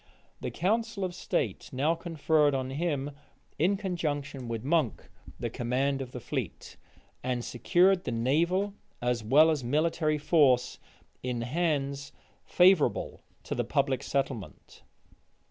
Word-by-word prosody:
The - - -3
council 220 +3 -1
of 180 - -4
state 120 - -2
now 140 +5 +1
conferred 160 -3 +1
on 130 0 -2
him, 145 -1 -1 0.5
in 185 +6 +3
conjunction 145 - -3
with 115 -1 -4
Monk, 150 -4 0 0.3
the - - -3
command 135 +3 0
of 130 -2 -6
the 125 - -6
fleet; - - -5 0.5
and 125 -1 -2
secured 180 - +3
the - - -2
naval, 170 - +1 0.3
as 120 -1 -1
well 150 +9 +6
as 150 -5 -1
military 155 +3 +1
force, 145 -5 +3 0.4
in 125 -2 -2
hands 140 0 -1 0.3
favorable 180 -3 +3 0.2
to - - -4
the - - 0
public 130 -1 0
settlement. 120 - -4
145 Hz, 130 wpm, -29 LUFS, 125-170 Hz, 0.5 s, well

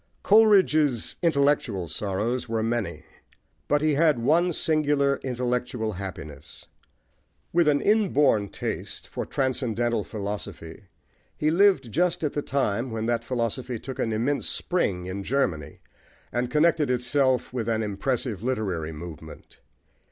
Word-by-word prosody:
Coleridge's 185 - +4
intellectual 140 - +1
sorrows 105 +8 -2
were 115 -1 0
many; 115 -2 -2 0.6
but 145 +1 +2
he 155 -1 +3
had 155 -1 +3
one 160 +9 +2
singular 145 -3 +1
intellectual 125 -3 -2
happiness. 85 -5 -8 0.9
With 170 -1 +3
an 145 -1 +3
inborn 150 - +3
taste - - -5
for - - -5
transcendental 120 -4 0
philosophy, 100 -3 -6 0.5
he 155 +1 +1
lived 175 - +3
just 175 +4 +1
at 150 - -1
the 145 - -1
time 130 -4 -1
when 110 -1 -3
that 115 0 0
philosophy 120 +1 -2
took 130 +3 -8
an 115 - 0
immense 120 +7 0
spring 95 - -1
in 95 +2 -4
Germany, 95 - -2 0.5
and 120 0 -1
connected 150 0 +2
itself 125 +1 +1
with 115 -3 -2
an 110 -1 0
impressive 110 0 -2
literary 100 -10 -2
movement. 80 0 -10
125 Hz, 125 wpm, -25 LUFS, 110-145 Hz, 0.9 s, Coleridge's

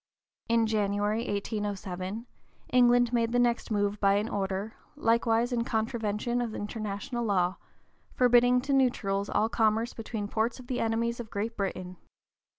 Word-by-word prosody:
In 230 -1 +3
January, 210 0 0
1807, 200 0 -3 0.5
England 245 -1 +5
made 230 -1 +1
the - - +3
next 240 -1 +1
move 205 -1 0
by 200 -1 +4
an 210 +3 0
order, 195 +2 -2 0.2
likewise 230 -2 +2
in 235 -1 +1
contravention 225 +1 -1
of 230 -2 -3
international 210 +2 -4
law, 185 -4 +1 0.6
forbidding 245 0 +5
to 280 +2 -1
neutrals 205 -7 +1
all 220 - +2
commerce 225 +1 +1
between 220 -2 -5
ports 225 +4 -1
of 255 - -11
the 245 0 -3
enemies 230 +1 0
of 230 -2 -6
Great 220 +3 -3
Britain. 185 -2 -4
225 Hz, 145 wpm, -29 LUFS, 205-240 Hz, 0.6 s, England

